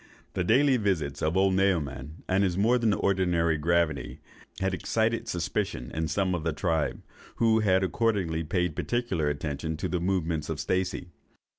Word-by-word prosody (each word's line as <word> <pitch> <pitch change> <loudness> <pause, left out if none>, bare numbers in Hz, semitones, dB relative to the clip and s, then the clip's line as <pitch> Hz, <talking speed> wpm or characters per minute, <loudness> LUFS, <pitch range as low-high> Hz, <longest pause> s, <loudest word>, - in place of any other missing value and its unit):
"The - - -1
daily 130 +7 +4
visits 80 - -1
of 80 +4 +1
old 95 0 +3
Naoman, 80 -6 -1
and 95 +2 +2
his 90 -2 0
more 115 +5 +3
than 115 -2 +2
ordinary 90 -5 +1
gravity, 85 0 0 0.4
had 95 0 0
excited 110 +4 0
suspicion 95 - -2
in 80 0 -1
some 95 +2 0
of 85 -3 -2
the 80 -2 0
tribe, 80 -2 -1 0.3
who 110 -1 +3
had 95 -3 +3
accordingly 95 -6 0
paid 90 0 -1
particular 120 -11 -1
attention 75 +2 -3
to 95 - -2
the 90 0 -1
movements 85 -4 -1
of 80 -2 -3
Stacey. 90 +2 -2
90 Hz, 160 wpm, -28 LUFS, 80-100 Hz, 0.4 s, daily